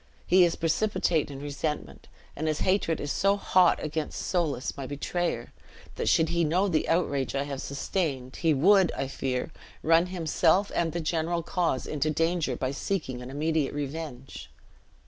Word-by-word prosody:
He 185 +1 +6
is 170 -1 +2
precipitate 165 -2 +1
in 135 -1 -7
resentment; 145 +1 -4 0.3
and 155 +2 -3
his 155 -1 -1
hatred 185 -4 +1
is 145 - -3
so 200 +1 +2
hot 185 -3 +4
against 155 0 -3
Soulis, 160 -8 -1
my 135 -2 -6
betrayer, 145 -2 -3 0.4
that - - -1
should 160 -1 +3
he 170 0 +1
know 175 +6 +2
the 160 -5 0
outrage 140 -6 0
I 140 - +1
have 140 -2 -5
sustained 140 -3 -3
he 165 - +2
would, 185 +5 +5
I - - -2
fear, 130 +1 -3 0.3
run 165 +2 +4
himself 180 +2 +2
and 165 -1 0
the 170 - -3
general 165 +1 -1
cause 165 -10 -1
into 150 0 -1
danger 165 -3 0
by 130 +1 -2
seeking 140 -5 -3
an 125 - -8
immediate 150 +1 -1
revenge." 145 -2 -6
160 Hz, 165 wpm, -27 LUFS, 140-175 Hz, 0.4 s, He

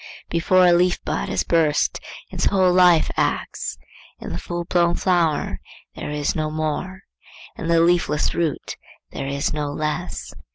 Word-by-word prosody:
Before 180 +2 +4
a 175 - +6
leaf 180 +1 +3
bud - - -2
has - - 0
burst, 160 -3 +1 0.3
its - - -2
whole 185 -2 +3
life 180 -3 +5
acts; - - -2 0.4
in - - -7
the 85 - -4
full 175 - -4
blown 170 -1 +2
flower 170 -5 +1 0.3
there - - -6
is 150 -1 -1
no 155 -1 -1
more; 155 +5 -3 0.5
in 165 - -5
the 170 0 +4
leafless 170 -3 +2
root 165 -5 -2 0.3
there 135 - -5
is 140 +1 -1
no 150 -1 -2
less. 155 +4 -4
165 Hz, 155 wpm, -22 LUFS, 150-175 Hz, 0.5 s, a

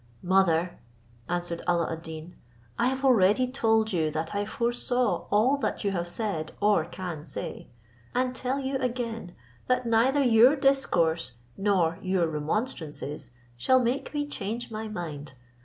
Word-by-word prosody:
"Mother," 180 -2 +2 0.5
answered 175 -1 -2
Alla 170 -2 +1
ad 160 - -7
Deen, 160 +1 -9 0.4
"I 235 - +3
have 265 +1 -1
already 230 -1 +5
told 225 -4 +1
you 160 -3 +1
that 160 +3 -3
I 205 0 -1
foresaw 240 +2 0
all 235 +7 +3
that 280 - -2
you 200 - +1
have 175 -2 -2
said, 175 -5 -3
or 205 -6 +3
can 175 -3 -6
say: - - -6 0.5
and 255 0 +1
tell 260 +2 -1
you 270 0 -1
again, 230 -7 -3 0.3
that 255 0 +1
neither 245 +5 +3
your 245 +3 +6
discourse 170 - +1 0.2
nor 185 -5 +1
your 185 -2 +1
remonstrances 155 - -3 0.3
shall 260 - +3
make 250 +2 -1
me 290 -1 -1
change 235 -3 -5
my 220 0 -4
mind. 155 -9 -6
205 Hz, 145 wpm, -27 LUFS, 170-250 Hz, 0.5 s, your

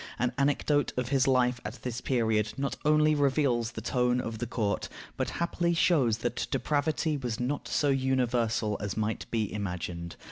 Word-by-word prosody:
An 125 +2 0
anecdote 145 +1 +2
of 125 -1 -1
his 135 -1 +2
life 125 -2 +2
at 110 +2 -7
this 125 -1 -3
period 110 -4 +1
not 140 0 -1
only 155 +1 +4
reveals 135 -5 +1
the - - -5
tone 125 -1 +1
of 115 -3 -4
the 120 - -2
court, 110 -4 -1 0.3
but - - -1
happily 170 0 0
shows 135 -10 +3
that 120 0 -1
depravity 150 +1 0
was 120 -5 -3
not 130 +4 -2
so 145 - +1
universal 125 -5 +1
as 100 0 -3
might 110 0 -2
be 110 -3 -1
imagined. 90 -4 -4
125 Hz, 170 wpm, -29 LUFS, 110-140 Hz, 0.3 s, only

